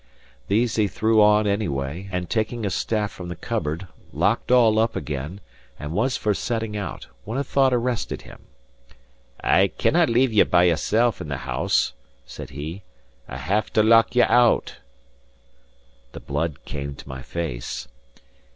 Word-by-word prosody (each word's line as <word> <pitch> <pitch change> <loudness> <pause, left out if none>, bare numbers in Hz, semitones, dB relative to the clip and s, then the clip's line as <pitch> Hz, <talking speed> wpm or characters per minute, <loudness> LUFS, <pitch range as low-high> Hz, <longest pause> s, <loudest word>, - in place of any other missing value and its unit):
These 115 +3 +1
he 105 -2 +3
threw 110 +2 +2
on 105 0 +5
any 100 0 0
way, 70 +7 -4
and 90 -1 -3
taking 110 +3 -1
a 100 - -1
staff 105 0 -1
from 90 - -9
the 90 - -5
cupboard, 80 +3 -3 0.3
locked - - 0
all 115 -4 +5
up 115 +1 +1
again, 75 +7 -5 0.4
and 75 0 -6
was 120 +7 +1
for 105 - 0
setting 110 0 -3
out, 100 -1 -5 0.2
when 110 +5 -4
a 140 - 0
thought 135 -2 +2
arrested 120 -1 -1
him. - - -13 1.0
"I 95 +1 +4
cannae 160 - +2
leave 120 0 +2
you 105 - +6
by 90 0 +4
yoursel' 110 +7 +2
in - - -6
the 70 -2 -3
house," 65 -2 0 0.3
said - - -9
he. 75 +7 -7 0.5
"I'll - - -6
have 105 +4 -1
to 110 - +4
lock 115 +2 +5
you 125 - +6
out." 120 -1 +3 1.3
The - - -7
blood 75 +1 -3
came 70 -1 -5
to - - -13
my 65 0 -7
face. 65 -5 -5
105 Hz, 160 wpm, -23 LUFS, 80-115 Hz, 1.3 s, you